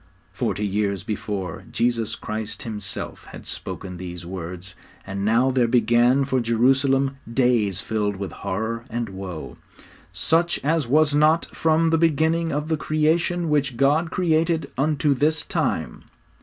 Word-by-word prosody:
Forty 105 - -1
years 100 -1 -1
before, 100 -3 -4
Jesus 115 -2 0
Christ 110 +4 -5
Himself 105 -6 -5
had - - -11
spoken 90 -2 -6
these 90 -1 -7
words, 90 +1 -7 0.3
and 100 0 -4
now 115 +5 +3
there 125 -2 +2
began 120 +3 +3
for 130 -1 +1
Jerusalem 135 +4 +2
days 115 -6 +2
filled 105 -2 -1
with 95 -1 -5
horror 110 +4 -3
and 115 -1 -3
woe, 95 -4 -7 0.5
'_such 170 +1 +1
as 155 -3 +1
was 150 +3 +3
not 155 +3 +4
from 160 0 +2
the 165 - +3
beginning 165 +1 +2
of 150 +2 -2
the 160 -1 0
creation 165 +3 +1
which 140 -5 +1
God 150 +6 +3
created 165 -3 +1
unto 145 +1 +2
this 155 +4 +1
time. - - -2
125 Hz, 140 wpm, -23 LUFS, 105-155 Hz, 0.5 s, not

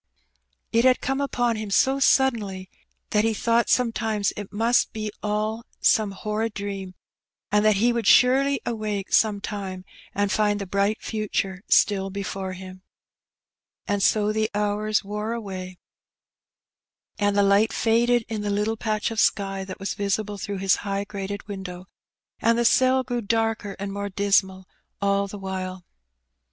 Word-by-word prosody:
It 230 +1 +3
had 255 0 +5
come 270 +1 -1
upon 245 -4 0
him 215 -1 -5
so 265 +7 +3
suddenly 215 -9 +2 0.4
that 210 0 +3
he 225 -1 +1
thought 230 +2 +1
sometimes 225 -4 +1
it 205 -2 -7
must 230 +4 +2
be 215 -1 -4
all 215 +2 -2 0.2
some 215 -2 +3
horrid 210 +3 -3
dream, 195 -2 -5 0.6
and 210 0 +3
that 215 -1 +4
he 235 +5 +3
would 230 -3 -1
surely 270 +3 +5
awake 215 -4 -3
some 210 -2 +3
time 195 -3 -6 0.3
and 205 0 +1
find 210 -1 +1
the 200 - -4
bright 200 +3 0
future 200 -3 -2
still 195 -2 +3
before 195 -1 -4
him. 185 0 -10 1.1
And 205 -1 0
so 210 +1 +3
the 215 0 0
hours 210 +1 0
wore 210 +3 -3
away, 185 -5 -6 1.4
and 205 -1 +1
the 200 - +5
light 200 +3 +4
faded 235 +1 +2
in 220 -2 -4
the 210 - -2
little 210 +2 0
patch 215 0 -1
of 225 - -3
sky 195 -1 +1
that 190 - -8
was 195 - -3
visible 205 0 -2
through 200 0 -4
his 190 0 +2
high 200 0 -3
grated 200 0 -6
window, 190 -3 -7 0.5
and 230 0 +3
the 235 - +1
cell 260 +2 +4
grew 245 -1 -3
darker 225 -2 -1
and 195 0 -5
more 200 0 -3
dismal 190 -1 +1 0.3
all 200 0 +1
the 205 - -8
while. 185 -2 -5
205 Hz, 155 wpm, -24 LUFS, 195-225 Hz, 1.4 s, had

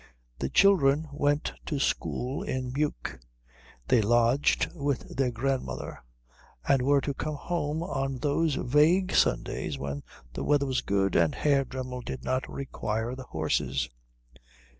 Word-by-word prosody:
The 65 - -1
children 155 - +4
went 145 +1 +1
to 150 - -1
school 135 -1 -1
in 130 -1 -3
Meuk. 145 - -2 0.7
They 120 - +4
lodged 120 +5 +3
with 145 -5 -3
their 130 -1 +2
grandmother, 130 +3 -3 0.7
and 135 -2 +4
were 140 +2 +3
to 140 - -2
come 155 +2 -3
home 155 0 -2
on 135 -6 -2
those 150 +2 +1
vague 160 +9 +3
Sundays - - +1
when 70 +1 -4 0.3
the - - -4
weather 145 -1 +3
was 130 -2 0
good 100 -1 +1
and 85 -2 +3
Herr 140 -2 +3
Dremmel 130 -1 -5
did 130 - -6
not 130 0 -1
require 115 -3 -3
the 130 0 -7
horses. 65 -5 -1
135 Hz, 140 wpm, -28 LUFS, 120-145 Hz, 0.7 s, children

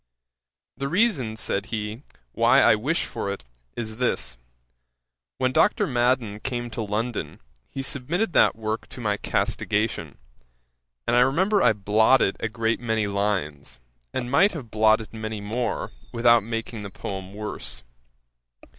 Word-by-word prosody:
The 135 +1 -2
reason 150 - +1
(said 100 -1 -1
he) 110 +1 -4 0.3
why - - +4
I - - +6
wish 135 +11 0
for 100 - -4
it, 100 - -6 0.3
is 110 -2 -5
this: 65 - 0 1.0
when 130 - +1
Dr. 155 +5 +3
Madden 120 -5 +1
came 120 -1 -4
to 115 - -4
London, 110 +3 -3 0.3
he 135 - -5
submitted 160 - -1
that - - +5
work 110 0 -3
to - - -11
my 105 -3 0
castigation; 105 +1 -1 0.9
and 120 - +2
I - - +6
remember 185 +11 +3
I - - +5
blotted 105 +2 +3
a 115 - -2
great 115 0 0
many 110 -3 0
lines, 100 -10 -2 0.3
and 120 -1 -3
might 185 +9 +5
have 130 -10 -7
blotted 110 +1 +3
many 110 -1 -4
more, 110 +3 -2 0.2
without 120 0 +5
making 115 0 -4
the 100 - -6
poem 95 0 -6
worse. 65 -12 -5
115 Hz, 140 wpm, -25 LUFS, 105-125 Hz, 1.0 s, I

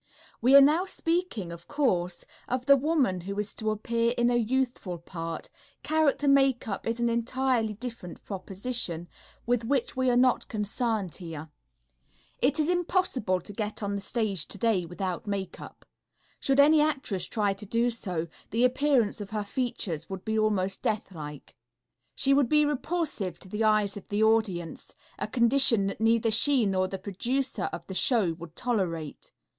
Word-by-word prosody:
We 255 +4 +5
are 280 - +11
now 310 +6 +4
speaking, 330 - -2
of 170 0 -11
course, 185 -12 -1 0.2
of 255 0 -2
the 280 - +7
woman 270 - +1
who 200 +3 -6
is 210 0 -2
to 220 - -3
appear 230 +2 0
in 240 0 +3
a - - +2
youthful 240 -6 -1
part; 165 -1 -7 0.3
character 305 -2 +1
makeup 270 -7 +2
is 230 +1 -2
an 235 - +1
entirely 235 -1 0
different 225 -6 -8
proposition, 195 -3 -2 0.4
with 245 -1 +1
which 255 +1 -1
we 260 0 +1
are 245 - +3
not 250 0 +3
concerned 215 - -2
here. 160 -3 -8 0.9
It 285 +4 +2
is 305 - +2
impossible 350 - 0
to 205 - -8
go 210 +1 -2
on 200 0 -2
the 200 - -3
stage 200 -6 0
today 200 -4 0
without 185 +3 -4
makeup. 200 -2 -6 0.5
Should 270 0 +1
any 300 +2 +6
actress 275 - 0
try 205 -3 0
to 200 +2 -9
do 235 +3 +1
so, 180 -8 -3 0.2
the 230 +3 +1
appearance 250 -4 +2
of 200 - -7
her 215 -1 -2
features 200 - -3
would 190 -1 -7
be 220 0 0
almost 195 -3 0
deathlike. 155 -9 -5 0.6
She 275 0 +3
would 275 -3 +3
be 300 0 +4
repulsive 295 - -2
to - - -12
the 210 +4 -2
eyes 215 -2 +2
of 205 - -9
the 210 +1 +1
audience, 215 -7 0 0.2
a - - -2
condition 235 -3 +5
that 195 +2 -4
neither 225 0 +3
she 265 +1 +5
nor 185 -1 +1
the 195 - -5
producer 245 +8 -2
of - - -7
the 190 - -7
show 200 -4 +2
would 165 -1 -10
tolerate. 175 - -3
220 Hz, 165 wpm, -28 LUFS, 190-260 Hz, 0.9 s, are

